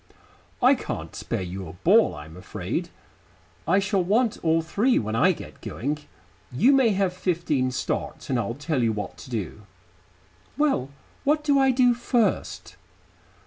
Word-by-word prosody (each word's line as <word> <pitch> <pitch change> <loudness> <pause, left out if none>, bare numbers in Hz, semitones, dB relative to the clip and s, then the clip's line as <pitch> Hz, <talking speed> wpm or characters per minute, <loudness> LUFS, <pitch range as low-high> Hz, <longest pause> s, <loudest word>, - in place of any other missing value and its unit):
"I - - +7
can't - - -5
spare - - -3
you 90 +1 -6
a 80 - -9
ball, 85 - +4
I'm 75 +2 -10
afraid. 90 - -4 0.8
I 190 - +4
shall 200 -1 +1
want 220 +5 +1
all 165 0 +2
three 215 +10 +2
when 110 0 -1
I 115 - +4
get - - -9
going. 145 +5 -3 0.5
You 150 - +4
may 265 -4 +5
have 195 -3 +1
fifteen 165 -8 0
start, 130 - -3
and 130 -3 0
I'll 115 +1 -2
tell 145 -1 -1
you 115 -2 +2
what 105 -1 -5
to - - -11
do." 105 -4 -4 1.0
"Well, 280 - +1 0.3
what 300 +1 +2
do 285 -2 +3
I 270 0 +4
do 250 -1 +4
first?" 240 -1 -1
165 Hz, 155 wpm, -25 LUFS, -, 1.0 s, I